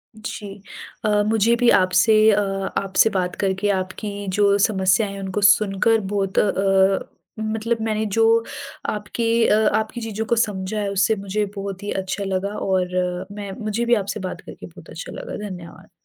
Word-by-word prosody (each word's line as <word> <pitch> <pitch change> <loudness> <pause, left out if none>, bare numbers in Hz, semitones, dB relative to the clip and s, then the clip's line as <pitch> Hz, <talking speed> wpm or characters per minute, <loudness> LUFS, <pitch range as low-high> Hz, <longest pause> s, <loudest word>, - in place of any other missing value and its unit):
जी 205 -2 -8 0.4
अ, 210 -1 +3
मुझे 225 +1 +3
भी 240 0 +3
आपसे 185 +4 +3 0.2
अ, 205 - +3 0.4
आपसे 195 +3 +3
बात 185 -3 -2
करके 195 +1 -1
आपकी 200 +1 -3
जो 200 -1 +4
समस्या 195 0 +2
है 200 0 -7
उनको 195 +1 -3
सुनकर 205 +2 +4
बहुत 195 -2 0
अ - - +6
अ, 195 0 +3 0.4
मतलब 220 +1 -2
मैंने 220 0 -1
जो 220 +2 +1 0.7
आपके 210 +2 -3 0.2
अ, - - +4 0.2
आपकी 220 +2 -3
चीज़ों 220 -1 -4
को 235 - +1
समझा 210 -2 -1
है 205 -1 -1
उससे 200 +3 +2
मुझे 200 +1 -2
बहुत 195 0 -6
ही 205 - -3
अच्छा 190 +2 -4
लगा 195 +1 -2
और 180 -1 -1
मैं 200 -1 -6
मुझे 215 +3 -1
भी 240 - +3
आपसे 200 0 -3
बात 185 -2 -5
करके - - -11
बहुत - - -14
अच्छा - - -8
लगा। - - -7
धन्यवाद। 175 -2 -10
200 Hz, 170 wpm, -22 LUFS, 190-215 Hz, 0.7 s, अ